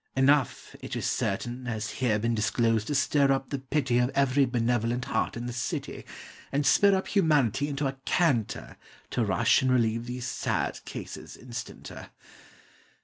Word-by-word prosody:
Enough, 135 -1 +2
it - - -6
is - - -3
certain 120 +5 -2
Has 110 -2 -3
here 120 -5 +1
been 115 +2 0
disclosed 110 0 +1
to 145 - -1
stir 140 0 +3
up 135 0 -1
the 140 - -2
pity 130 -2 0
Of 125 0 +2
every 140 0 +3
benevolent 120 0 0
heart - - -1
in 120 - -5
the 120 - -4
city, 120 - -4 0.5
And 145 +1 0
spur 200 +8 +5
up 190 - -2
Humanity 145 - +2
into 145 0 -2
a 135 0 -2
canter 140 - 0 0.3
To 120 - +1
rush 115 +5 +3
and 130 -1 +2
relieve 115 -1 +1
these 125 0 -5
sad 120 - -2
cases - - -8
instanter. 125 0 -8
125 Hz, 160 wpm, -28 LUFS, 115-140 Hz, 0.5 s, spur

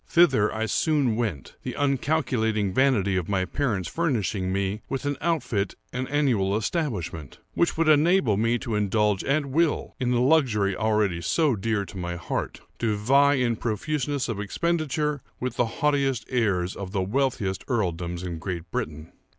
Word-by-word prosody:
Thither 135 -12 +4
I 110 +1 -2
soon 140 -1 +1
went; 105 - -3
the - - -5
uncalculating 125 -8 0
vanity 105 -7 +2
of 90 0 -2
my 95 -2 +1
parents 105 - -1
furnishing 110 - -1
me 100 +2 -1
with 135 0 -3
an 145 0 0
outfit 140 - -1 0.2
and 125 +1 -3
annual 115 -9 +2
establishment, 105 - -3 0.2
which 170 - +1
would 165 -1 +2
enable 155 - +4
me 115 +3 +2
to 120 -1 -5
indulge 105 -1 +1
at 140 +2 +1
will 155 +4 0
in 125 - 0
the 125 -1 +2
luxury 120 -9 +3
already 105 -5 +1
so 145 - +2
dear 105 0 -1
to 100 - -11
my 85 -1 -3
heart,—to 105 +5 -3
vie 140 +7 +4
in 125 -3 +1
profuseness 140 +5 -2
of 115 -4 -3
expenditure 150 - -1 0.2
with 125 -1 -3
the 120 - +2
haughtiest 135 -2 0
heirs 100 -7 +1
of 95 -1 -7
the 95 -2 +1
wealthiest 110 -3 -1
earldoms 90 -7 -2
in 85 -3 -4
Great 85 -1 -5
Britain. 75 +1 -4
115 Hz, 160 wpm, -25 LUFS, 100-140 Hz, 0.2 s, Thither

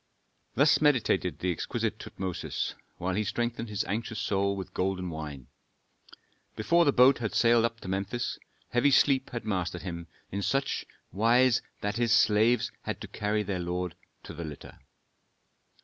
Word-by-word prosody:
'" - - -44
Thus 145 +4 +4
meditated 120 - +2
the 90 - -1
exquisite 85 - -2
Tutmosis, 95 -2 -4 0.2
while 90 +1 -2
he 105 +3 0
strengthened 120 +2 -2
his 105 -2 -1
anxious 110 +2 -3
soul 100 0 0
with 95 -1 -7
golden 90 -1 -1
wine. 75 -5 -7 1.1
Before 170 +11 +3
the 140 - +5
boat 130 0 +6
had 110 -3 -3
sailed 115 -1 +5
up 115 0 -3
to - - -8
Memphis, 100 +5 -2 0.3
heavy 125 +4 +3
sleep 135 -1 +3
had 120 -3 -5
mastered 90 -5 -2
him 85 -2 -6 0.2
in 100 - -2
such 135 +8 -1 0.2
wise 120 +4 +4 0.2
that 105 +1 -2
his 120 -1 +1
slaves 110 +1 +4
had - - -4
to - - -6
carry 105 +1 -1
their 95 -2 -3
lord 90 0 -3 0.3
to - - -9
the 85 - -6
litter. 75 -3 -9
105 Hz, 160 wpm, -29 LUFS, 90-120 Hz, 1.1 s, boat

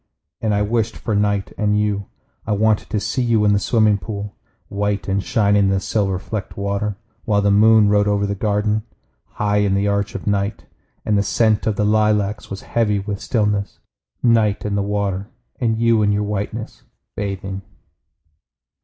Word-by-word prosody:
And 110 - 0
I 105 - +2
wished 115 +1 -1
for 110 - -3
night 100 -1 0
and 105 0 +2
you. 100 -2 -1 0.4
I 105 - +1
wanted 110 +1 +1
to 105 - 0
see 130 - -2
you 115 -3 +2
in 105 - +4
the 100 - +3
swimming 105 -1 +2
pool, 100 -1 -6 0.3
White 100 0 -2
and 95 0 0
shining 105 -5 +2
in - - +2
the 95 0 +2
silver 95 -1 0
flecked 100 +2 -6
water. 100 0 -2 0.3
While 100 -2 +2
the 100 - +3
moon 110 +1 +6
rode 105 0 +3
over 100 0 +1
the 100 - -1
garden, 105 +1 0 0.5
High 105 -1 0
in 100 -1 +2
the 100 +1 +1
arch 100 0 -1
of 100 - -5
night, 100 0 -1 0.4
And 105 -1 +2
the - - +3
scent 110 +1 +1
of 110 - +1
the 105 - 0
lilacs 105 -1 +1
was 100 - -6
heavy 110 -3 0
with 100 0 -4
stillness. 105 -4 -1 0.5
Night, 110 -4 +2
and 105 -1 -1
the 100 - +1
water, 100 0 -2 0.3
and 115 -3 +1
you 115 -1 +3
in 105 -1 +3
your 105 0 +1
whiteness, 105 +2 -4 0.3
bathing! 95 -1 -4
105 Hz, 180 wpm, -20 LUFS, 100-110 Hz, 0.5 s, moon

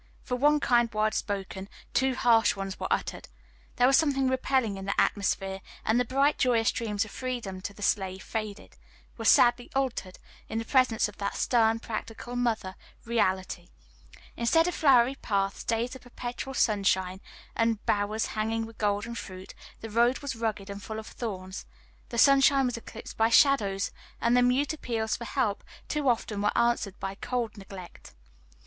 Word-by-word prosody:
For 250 - -2
one 295 +4 +4
kind 240 -4 +3
word 215 0 +1
spoken, 195 -1 -4 0.2
two 265 0 +2
harsh 230 -3 +4
ones 195 -1 -5
were - - -2
uttered; - - -2 0.5
there 245 - +4
was 270 +1 +6
something 275 -4 +2
repelling 260 -5 +1
in 195 - -7
the 200 - -1
atmosphere, 195 -1 0 0.2
and 225 +2 +3
the 250 - +1
bright 275 +4 +2
joyous 230 -4 +3
dreams 220 -2 -2
of 215 - -12
freedom 240 -8 -4
to 195 - -5
the 205 +1 -10
slave 190 -2 0
faded 215 -2 -6 0.4
were 225 - -7
sadly 240 +1 +5
altered, 255 -9 -2 0.3
in 225 - -3
the 225 - -2
presence 255 -4 +3
of 210 - -12
that 200 -1 -3
stern, 225 -2 +3
practical 225 +2 -6
mother, 230 -6 -1 0.3
reality. 190 -6 -1 0.7
Instead 325 +9 +3
of 355 - -1
flowery 260 -4 +4
paths, 200 -6 -2
days 230 +2 -1
of 260 - -11
perpetual 245 +2 -6
sunshine, 190 -4 +1 0.3
and 225 -2 0
bowers 210 +2 0
hanging 225 +1 -1
with 225 0 -13
golden 210 +2 0
fruit, 185 -5 -8 0.3
the 225 - -6
road 235 +3 +3
was 280 -3 -5
rugged 220 -3 -3
and 200 0 -7
full 220 +2 -6
of 220 - -6
thorns, 190 -6 -6 0.4
the 235 - -5
sunshine 275 +1 +5
was 245 - -1
eclipsed 230 - -9
by 225 0 +3
shadows, 215 -7 +3 0.3
and 235 +1 +2
the 250 - +5
mute 260 +5 +2
appeals 230 -7 -2
for 235 - -7
help 215 -3 -1 0.2
too 295 -3 0
often 220 -3 -1
were 205 - +1
answered 235 -4 +1
by 195 0 -4
cold 235 +2 -3
neglect. 195 -3 -11
225 Hz, 170 wpm, -28 LUFS, 200-250 Hz, 0.7 s, was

